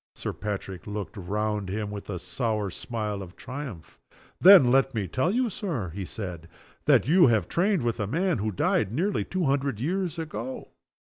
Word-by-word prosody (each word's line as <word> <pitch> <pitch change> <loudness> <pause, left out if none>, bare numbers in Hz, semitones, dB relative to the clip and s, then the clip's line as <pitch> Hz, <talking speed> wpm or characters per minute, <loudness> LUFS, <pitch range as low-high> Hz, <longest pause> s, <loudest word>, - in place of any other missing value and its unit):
Sir - - -4
Patrick 100 -3 -5
looked 105 +1 -5
round 105 +1 -2
him 105 +1 -3
with 105 -1 -7
a 95 - -3
sour 100 +3 -2
smile 105 -2 -4
of 90 -2 -10
triumph. 130 - -8 0.4
"Then 180 -10 +9
let 135 0 +3
me 105 -4 -1
tell 130 - 0
you, 245 +5 +1
Sir," 165 - -3
he 95 0 -4
said, 90 -5 -6 0.4
"that - - +4
you 170 -2 +6
trained 180 - +1
with 120 -1 -1
a 105 - -1
man 170 - 0
who 110 +1 -1
died 100 +1 +1
nearly 185 - 0
two 185 -1 -2
hundred 135 -5 0
years 175 +4 -1
ago." 165 +11 -5
115 Hz, 170 wpm, -27 LUFS, 100-160 Hz, 0.4 s, Then